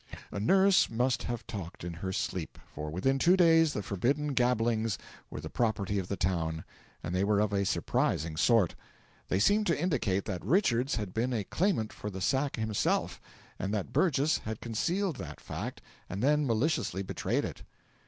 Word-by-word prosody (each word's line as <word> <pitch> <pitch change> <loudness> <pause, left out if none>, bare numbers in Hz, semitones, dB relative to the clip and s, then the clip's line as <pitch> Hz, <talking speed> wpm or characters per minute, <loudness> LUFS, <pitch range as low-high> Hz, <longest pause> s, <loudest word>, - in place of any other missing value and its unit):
A - - -4
nurse 190 - +4
must 120 +2 +1
have 120 -2 -4
talked 90 -6 -7
in 85 -1 -4
her 95 +3 -4
sleep, - - -3 0.2
for 75 +1 -5
within 135 - 0
two 180 +6 +5
days 165 -3 +5
the 105 - -3
forbidden 140 +11 0
gabblings 115 -4 +1 0.3
were - - -6
the - - -6
property 105 -4 0
of 95 - -4
the 100 - -2
town; 80 -3 -1 0.4
and 85 - -4
they 90 +1 +1
were 100 0 +2
of 105 -1 +1
a 100 0 +1
surprising 80 -3 0
sort. 100 +2 +3 0.5
They - - +1
seemed 205 - +3
to 165 -4 +1
indicate 120 - 0
that 95 -5 -4
Richards 140 - +2
had 105 -5 -4
been 120 +3 0
a 110 -3 0
claimant 165 - 0
for 105 - -6
the 95 -2 -6
sack 135 +7 +1
himself, 110 -2 -1 0.4
and 95 - -2
that 100 - -3
Burgess 155 -4 +2
had 110 0 -5
concealed 170 - -1
that - - -7
fact - - -6 0.3
and 100 +5 -4
then 150 +1 +3
maliciously 115 - 0
betrayed 95 - -1
it. - - -7
110 Hz, 180 wpm, -30 LUFS, 95-145 Hz, 0.5 s, two